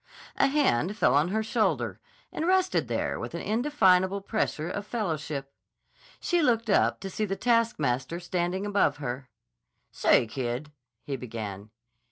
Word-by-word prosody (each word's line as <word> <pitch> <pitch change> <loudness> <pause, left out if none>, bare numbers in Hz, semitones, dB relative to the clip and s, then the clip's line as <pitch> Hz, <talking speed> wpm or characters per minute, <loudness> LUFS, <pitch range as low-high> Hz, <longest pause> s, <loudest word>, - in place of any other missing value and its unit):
A 275 - +4
hand 210 - +1
fell - - +4
on 145 +4 +4
her 220 +4 0
shoulder 220 0 0 0.3
and 320 - -2
rested 375 0 +2
there - - -2
with - - -5
an - - -4
indefinable 200 -6 +3
pressure 195 -6 -2
of 200 +3 -4
fellowship. 155 - -3 0.7
She 350 -1 +1
looked 230 -6 +2
up - - +3
to 195 - -5
see 215 - -1
the 195 -1 -2
taskmaster 170 - +1
standing 180 +2 -2
above 200 -8 +2
her. 130 -2 -5 0.6
"Say, - - +4
kid," 125 +4 -4 0.3
he 140 -2 -3
began. 110 -4 -6
185 Hz, 145 wpm, -28 LUFS, 140-225 Hz, 0.7 s, A